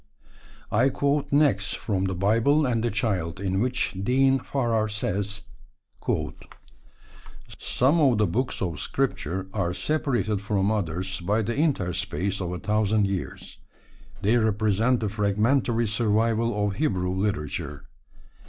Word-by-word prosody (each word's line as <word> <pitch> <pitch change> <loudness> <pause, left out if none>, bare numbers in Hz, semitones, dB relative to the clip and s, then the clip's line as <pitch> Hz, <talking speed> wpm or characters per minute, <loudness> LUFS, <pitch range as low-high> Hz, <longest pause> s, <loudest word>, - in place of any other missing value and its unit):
I 120 +6 +4
quote 140 +1 0
next 130 -10 +2
from 95 -3 -1
The 95 -1 -2
Bible 115 - +3
and 120 -3 0
the 120 - +1
Child, 95 -5 -1
in 95 -1 -1
which 125 -2 0
Dean 135 +3 +3
Farrar 115 -6 0
says: 100 0 -2 2.2
Some 140 +7 +2
of 130 -6 +4
the 105 - +3
books 115 +5 -1
of 85 -6 -3
Scripture 95 +5 -2
are 90 -4 -1
separated 110 - 0
from 100 0 0
others 95 -1 -2
by 105 +5 +1
the 115 +3 -2
interspace 100 - 0
of 90 -1 -3
a 90 - -3
thousand 105 +1 +1
years. 95 -2 -5 0.6
They 110 +5 +4
represent 110 +2 +2
the 110 - 0
fragmentary 115 +4 +1
survival 110 0 +1
of 100 - -4
Hebrew 95 -12 0
literature. 75 -7 -3
105 Hz, 125 wpm, -25 LUFS, 95-120 Hz, 2.2 s, I